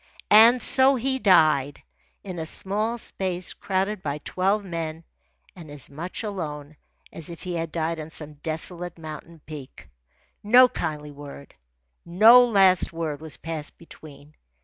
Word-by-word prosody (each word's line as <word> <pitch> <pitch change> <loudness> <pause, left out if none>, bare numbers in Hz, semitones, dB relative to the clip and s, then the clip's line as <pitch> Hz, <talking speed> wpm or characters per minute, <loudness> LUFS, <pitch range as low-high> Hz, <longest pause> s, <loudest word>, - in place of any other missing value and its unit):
And 225 +3 +7
so 265 +1 +4
he 265 +2 -1
died, 155 - +3 0.4
in 185 -3 -7
a 160 - -4
small 215 +7 -2
space 185 -5 -4
crowded 195 +1 -2
by 145 -3 -3
twelve 195 +6 -1
men 165 -2 -5 0.5
and 170 -4 -12
as 145 -2 -8
much 170 +9 -5
alone 155 -8 -6 0.4
as 165 - -3
if 170 - -10
he 180 - -5
had 165 -2 -4
died 165 0 -2
on 155 0 -7
some 150 -1 -6
desolate 170 +3 -1
mountain 160 0 -10
peak. 145 - -11 0.5
No 245 +5 +6
kindly 150 -8 -5
word, 140 -1 -12 0.5
no 220 +8 +7
last 195 -6 +3
word, 160 -3 -5
was 160 -1 -5
passed 160 -2 -6
between. 150 -3 -15
170 Hz, 145 wpm, -24 LUFS, 155-195 Hz, 0.5 s, And